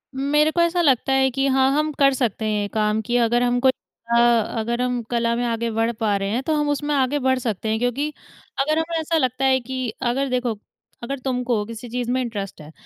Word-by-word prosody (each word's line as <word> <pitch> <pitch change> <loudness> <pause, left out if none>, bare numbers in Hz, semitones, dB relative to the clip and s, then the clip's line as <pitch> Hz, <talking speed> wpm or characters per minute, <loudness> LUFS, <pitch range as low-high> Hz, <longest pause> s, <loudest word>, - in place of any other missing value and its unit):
मेरे 295 +3 +2
को 340 - +1
ऐसा 340 +1 +2
लगता 270 -3 +2
है 265 0 +3
कि 270 +2 0
हाँ 265 0 +3
हम 305 0 +1
कर 275 -1 +5
सकते 230 -4 -1
हैं 210 -1 0
ये 205 - -2
काम 215 0 +1
कि 240 +2 -3
अगर 240 +1 +2
हम 245 0 +1
को 265 - +3
अ, 235 -2 -2 0.4
अगर 235 +2 -1
हम 250 -1 -1
कला 235 0 +1
में 245 - -1
आगे 230 0 -1
बढ़ 225 +1 0
पा 210 -2 +1
रहे 195 0 -2
हैं, 240 +5 -1
तो 315 - 0
हम 295 -1 0
उसमें 290 +1 -1
आगे 275 +2 +1
बढ़ 260 0 +1
सकते 220 -3 -3
हैं। 220 0 0
क्योंकि 245 +5 0 0.5
अगर 305 +3 +1
हमें 330 0 -2
ऐसा 320 +1 0
लगता 260 -1 0
है 260 0 +4
कि 255 0 -4
अगर 265 +2 0
देखो 250 -2 0 0.5
अगर 275 +2 -4
तुम 250 -1 -2
को 235 -4 0
किसी 230 +2 -8
चीज़ 245 0 -3
में 255 +1 +1
इंटरेस्ट 205 -8 -5
है। 150 +1 -12
250 Hz, 240 wpm, -22 LUFS, 230-270 Hz, 0.5 s, कर